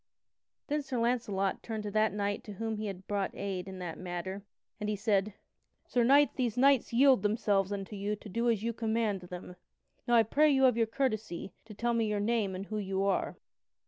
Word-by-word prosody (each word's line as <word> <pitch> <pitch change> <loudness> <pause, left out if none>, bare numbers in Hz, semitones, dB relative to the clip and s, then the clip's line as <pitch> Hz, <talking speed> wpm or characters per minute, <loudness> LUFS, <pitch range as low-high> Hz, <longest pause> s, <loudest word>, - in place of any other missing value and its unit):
Then 295 0 -1
Sir 270 -3 -4
Launcelot 230 -5 0
turned 220 -2 -5
to 205 - -4
that 215 +1 +2
knight 205 0 -2
to 210 - -7
whom 225 +2 -3
he 215 0 -3
had 190 -1 -7
brought 200 -1 -2
aid 190 -2 -4
in 190 -1 -7
that 175 -3 -6
matter, 185 +2 -5 0.4
and 210 -1 -2
he 210 - 0
said: 205 -1 0 0.5
"Sir 245 - +1
Knight, 280 +4 +5
these 245 -3 -1
knights 270 -1 +4
yield 260 -1 +5
themselves 205 -2 +1
unto 200 +1 -4
you 205 +1 -2
to 210 - -12
do 230 +5 0
as 220 -3 +1
you 235 0 -1
command 220 -3 -1
them. 180 0 -9 0.5
Now 240 - +4
I 230 - +7
pray 300 +8 +3
you 265 -2 +4
of 250 -3 +5
your 230 -1 +2
courtesy 215 -7 -2
to 215 -2 -11
tell 235 +3 0
me 230 -1 +1
your 210 -1 0
name 210 -3 0
and 190 +2 -5
who 215 +1 -3
you 195 -1 -1
are." 195 -1 0
215 Hz, 210 wpm, -31 LUFS, 195-235 Hz, 0.5 s, I